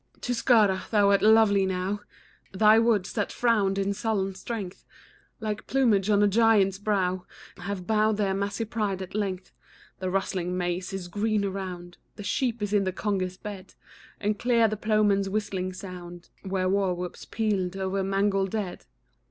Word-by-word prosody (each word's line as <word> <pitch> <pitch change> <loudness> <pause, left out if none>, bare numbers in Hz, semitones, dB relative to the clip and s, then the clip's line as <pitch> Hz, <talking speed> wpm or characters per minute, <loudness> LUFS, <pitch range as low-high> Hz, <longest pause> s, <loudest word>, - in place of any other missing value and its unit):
Tuscara! 225 -6 +2
thou 205 -2 +4
art 200 - +3
lovely 215 -2 +5
now, 190 +2 -1 0.5
Thy 215 +3 +6
woods, 220 -5 +1
that 205 -3 -1
frown'd 210 -5 +1
in 200 0 0
sullen 200 -2 -1
strength 195 -1 -6 0.6
Like 215 -1 -4
plumage 220 -7 +2
on 205 -1 +4
a - - +5
giant's 200 -2 +3
brow, 185 -3 -1 0.3
Have 190 -1 -5
bowed 215 0 +2
their 200 -2 +1
massy 200 +3 -2
pride 210 -4 -2
at 185 - -10
length. 195 -3 -3 0.5
The 185 0 -2
rustling 185 -1 -1
maize 180 +1 -2
is 195 -2 -5
green 210 +2 0
around, 185 -3 -6 0.2
The 205 - -8
sheep 235 +1 -1
is 205 0 -2
in 205 -1 +3
the 190 - -1
Congar's 185 -1 -2
bed; 195 -2 -9 0.4
And 210 0 -1
clear 235 -2 +3
the 215 - -2
ploughman's 210 -2 +2
whistlings 190 -3 -3
sound 175 -2 -9
Where 190 -1 -1
war 190 -1 +1
whoop's 180 0 -6
pealed 195 -4 -1
o'er 190 0 -1
mangled 195 0 +1
dead. 200 -3 -4
200 Hz, 160 wpm, -27 LUFS, 185-215 Hz, 0.6 s, Thy